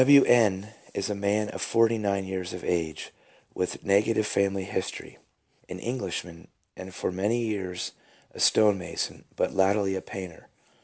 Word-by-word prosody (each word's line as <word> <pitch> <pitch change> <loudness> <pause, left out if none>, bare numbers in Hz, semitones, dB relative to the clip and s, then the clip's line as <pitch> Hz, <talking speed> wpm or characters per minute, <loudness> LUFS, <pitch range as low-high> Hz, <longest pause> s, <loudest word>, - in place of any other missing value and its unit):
W. 140 +1 +8
N. 105 -3 +3 0.2
is 100 +1 -1
a - - +1
man 105 +1 0
forty 115 0 +3
nine 100 -2 0
years 95 -2 -4
of 90 - -7
age, 80 -3 -2 0.4
with 90 - -3
negative 105 +2 +3
family 100 -2 +1
history, 95 0 -5 0.5
an 90 - -5
Englishman, 90 -6 -5 0.3
and 95 +1 -8
for 95 - -3
many 100 +6 0
years 95 -5 -3 0.4
a - - -12
stone 105 -3 +5
mason, 90 - -4
but - - 0
latterly 95 0 +2
a 95 - -3
painter. 90 -4 -8
100 Hz, 150 wpm, -27 LUFS, 95-105 Hz, 0.5 s, W